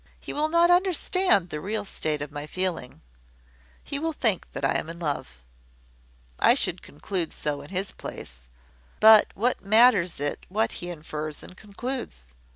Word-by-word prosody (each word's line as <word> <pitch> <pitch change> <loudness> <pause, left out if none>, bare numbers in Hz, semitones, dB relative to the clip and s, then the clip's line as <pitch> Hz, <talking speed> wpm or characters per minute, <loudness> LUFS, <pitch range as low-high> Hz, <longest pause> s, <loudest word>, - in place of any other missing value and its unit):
"He - - -7
will 305 +1 0
not 340 +2 +4
understand 360 - +2
the 150 - -4
real 210 +3 -3
state 150 -6 -2
of 145 - -8
my 145 +1 -6
feeling. 170 - -3 0.8
He 280 - -4
will 325 +1 -2
think 220 - 0
that - - -2
I - - +2
am - - -7
in 170 - -7
love. 150 -4 -3 1.0
I - - +5
should - - -1
conclude 170 +3 -4
so 145 -1 -3
in 145 - -12
his 190 +1 -2
place. - - -9 0.6
But 220 -1 +8
what 240 +5 0
matters 205 - +4
it 145 0 -3
what 215 +4 0
he 175 - -5
infers 155 -2 -6
and 180 - -12
concludes? 220 - -6
190 Hz, 160 wpm, -26 LUFS, 155-240 Hz, 1.0 s, But